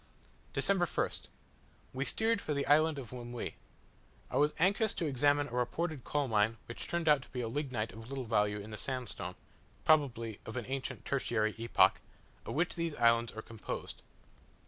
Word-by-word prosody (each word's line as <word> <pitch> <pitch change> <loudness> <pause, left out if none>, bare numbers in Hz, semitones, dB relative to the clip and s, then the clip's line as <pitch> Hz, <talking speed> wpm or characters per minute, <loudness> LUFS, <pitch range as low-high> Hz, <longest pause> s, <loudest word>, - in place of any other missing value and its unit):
December 195 -3 +3
1st. - - -1 0.7
We 135 +1 -1
steered 225 +4 +2
for 150 - -2
the 140 - 0
island 155 +1 +4
of 130 -3 -7
Lemuy. 120 -1 -5 0.8
I - - 0
was 150 +1 +3
anxious 200 +5 +3
to 170 - -1
examine 145 +1 +3
a - - -12
reported 135 +4 -1
coal 145 -2 0
mine 110 0 +2
which 120 - -7
turned 170 -1 -1
out 150 -3 +6
to - - -14
be 125 -3 -3
lignite 120 -3 -2
of 115 +2 -10
little 135 -1 -3
value, 105 -3 +2
in 105 +2 -8
the 105 - -5
sandstone 120 -9 -4 0.5
(probably 115 -8 +3
of 110 - -6
an 120 - -3
ancient 135 0 -4
tertiary 110 -5 +1
epoch) 115 0 +4 0.5
of - - -3
which 165 +4 +1
these 165 -2 -2
islands 115 -1 +4
are 110 - -6
composed. 115 -2 -6
130 Hz, 170 wpm, -33 LUFS, 115-150 Hz, 0.8 s, out